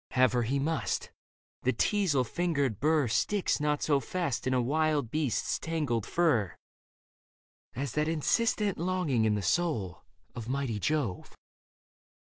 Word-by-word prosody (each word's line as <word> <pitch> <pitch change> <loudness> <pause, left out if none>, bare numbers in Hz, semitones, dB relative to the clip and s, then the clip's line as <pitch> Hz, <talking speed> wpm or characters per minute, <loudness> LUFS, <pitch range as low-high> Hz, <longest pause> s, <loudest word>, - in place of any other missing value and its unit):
Have 130 0 +4
her 125 - +2
he 125 +4 0
must: 155 +3 -1 0.5
the 130 - +2
teasel 170 - +2
fingered 140 - -1
burr 155 -2 +2
Sticks 170 - +1
not 150 0 0
so 145 -3 +3
fast 140 -6 -2
in 130 - +1
a - - +3
wild 145 0 +1
beast's 150 -7 0
tangled 150 -10 -2
fur 145 - +1 1.2
As 135 0 -3
that 150 +4 0
insistent 200 +5 +1
longing 170 -10 +1
in 105 -1 +2
the 105 - -2
soul 115 - -1 0.3
Of 115 -1 -7
mighty 130 -5 -1
Jove. 135 -7 -2
140 Hz, 135 wpm, -30 LUFS, 120-160 Hz, 1.2 s, Have